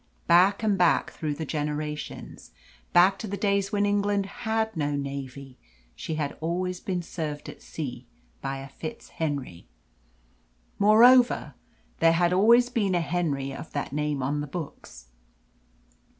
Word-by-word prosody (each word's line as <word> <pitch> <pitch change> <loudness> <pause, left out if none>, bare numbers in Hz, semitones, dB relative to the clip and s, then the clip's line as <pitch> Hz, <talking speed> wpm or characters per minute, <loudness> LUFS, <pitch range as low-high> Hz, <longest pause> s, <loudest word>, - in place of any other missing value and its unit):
Back 190 +5 +4
and 205 -3 +1
back 175 -1 +3
through 150 -2 -3
the 160 - -4
generations 150 0 -5 0.4
back 185 +3 +5
to 220 - -5
the 200 +1 -4
days 200 0 0
when 205 0 +1
England 205 0 +1
had 220 +2 -2
no 145 -2 -1
navy 140 -1 -6 0.4
she 160 - -4
had 150 -2 -3
always 180 +2 -2
been 180 -2 -3
served 155 -3 -5
at - - -10
sea 125 -5 -6 0.3
by 135 0 -3
a 135 0 -8
FitzHenry. 140 - -5 1.1
Moreover, 240 +5 +5 0.5
there 165 0 +5
had 175 +1 +2
always 235 +6 +5
been 210 -6 0
a - - +3
Henry 155 -6 -1
of 155 - -9
that 145 -1 -3
name 150 -2 -1
on 145 +3 -1
the 150 - -5
books. 135 - -8
165 Hz, 140 wpm, -26 LUFS, 145-200 Hz, 1.1 s, back